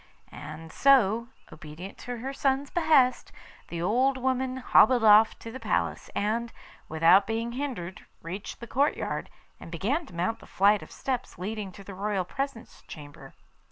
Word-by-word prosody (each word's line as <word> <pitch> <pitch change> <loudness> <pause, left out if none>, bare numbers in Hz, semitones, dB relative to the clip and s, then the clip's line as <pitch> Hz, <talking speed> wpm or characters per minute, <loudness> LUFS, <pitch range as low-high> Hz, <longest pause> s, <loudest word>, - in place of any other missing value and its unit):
And 155 +2 -9
so, 235 - +4 0.3
obedient 155 +5 -10
to 245 -1 -6
her 265 +4 -5
son's 275 0 0
behest, 290 -7 +3 0.4
the 170 0 -5
old 255 +8 +2
woman 260 0 -1
hobbled 245 -1 +4
off 215 +1 +6
to 230 - -9
the 260 - -8
palace, - - -2
and, 230 +3 -1 0.4
without 165 +5 +5
being 225 +1 -2
hindered, 240 -9 -5 0.2
reached 185 +8 -7
the - - -6
courtyard, 280 +5 -1 0.3
and - - -10
began 260 - -1
to - - -13
mount 180 +6 -1
the - - -15
flight 200 +2 +3
of - - -11
steps 260 -3 -4
leading 205 +1 -5
to 200 - -12
the 195 - -9
royal 195 -1 -2
presence 270 +2 -6
chamber. 145 -3 -11
225 Hz, 155 wpm, -27 LUFS, 185-260 Hz, 0.4 s, off